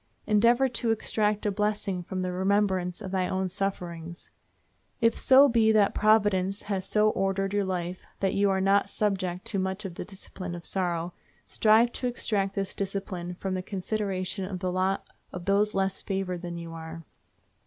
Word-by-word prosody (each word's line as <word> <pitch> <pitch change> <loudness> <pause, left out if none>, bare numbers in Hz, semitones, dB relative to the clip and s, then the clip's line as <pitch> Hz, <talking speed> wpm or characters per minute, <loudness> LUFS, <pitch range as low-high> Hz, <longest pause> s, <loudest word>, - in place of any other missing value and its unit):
Endeavor 235 +5 +4
to 235 -2 -2
extract 215 -1 0
a 205 - +2
blessing 205 -2 -1
from 185 +1 -4
the 180 - -2
remembrance 190 -1 0
of 190 - -6
thy 185 -1 0
own 190 0 -1
sufferings. 175 -3 -4 0.7
If 230 -2 +3
so 270 +2 +7
be 230 -3 +4
that 205 -2 +4
Providence 205 -3 +2
has 195 -2 -3
so 215 +1 +3
ordered 195 0 -1
your 205 -1 +1
life 180 -1 -3 0.2
that 195 -1 +1
you 200 0 +3
are 190 0 +1
not 195 +1 +3
subject 185 -3 -1
to 200 - -2
much 190 +2 -2
of 185 - -5
the - - -6
discipline 185 -2 -8
of 170 - -9
sorrow, 175 -2 -1 0.3
strive 225 +2 +4
to 250 - -3
extract 205 -5 -1
this 195 -1 -2
discipline 185 -3 -4
from 190 +1 -3
the 185 - -1
consideration 195 0 -3
of 185 0 -4
the 180 0 -2
lot 185 +1 0 0.2
of 180 -1 -7
those 205 +2 +3
less 195 0 0
favored 190 -3 -3
than 175 -1 -5
you 165 -1 -7
are. 165 0 -8
195 Hz, 175 wpm, -27 LUFS, 185-210 Hz, 0.7 s, so